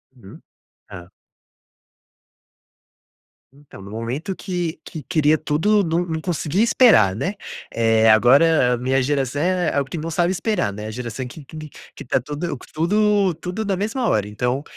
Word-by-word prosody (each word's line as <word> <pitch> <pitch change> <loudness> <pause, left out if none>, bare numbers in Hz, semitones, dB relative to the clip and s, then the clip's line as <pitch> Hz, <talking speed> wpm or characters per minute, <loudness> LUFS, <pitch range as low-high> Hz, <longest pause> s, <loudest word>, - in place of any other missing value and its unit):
Uhum, 105 -6 -14 0.5
hã. 90 -2 -11 2.4
Então, 140 -6 -15
no 100 - -11
momento 125 - -4
que 175 -4 -4
que 155 - -8
queria 155 -2 +2
tudo, 200 +9 +1
não 170 +1 0
não 160 -2 -4
consegui 175 +1 -1
esperar, 220 - +5
né. 180 - -2 0.4
Eh, 115 -1 +3
agora 125 +4 +5
a - - -1
minha 130 +2 0
geração 140 0 -1
é 180 0 +1 0.2
quem 165 - -5
não 165 +2 -5
sabe 175 +2 +1
esperar, 190 - -1
né. 105 +2 -8
A - - -6
geração 125 +2 -6
que 145 +4 -11
que 155 - -11
que 155 -1 -8 0.3
que - - -10
tá 130 - +1
tudo 150 +6 -4 0.2
tudo 200 +3 +2
tudo 180 +7 -5
na 195 -1 0
mesma 225 +6 -2
hora, 105 - +1
então 125 +6 -2
155 Hz, 160 wpm, -21 LUFS, 125-180 Hz, 2.4 s, esperar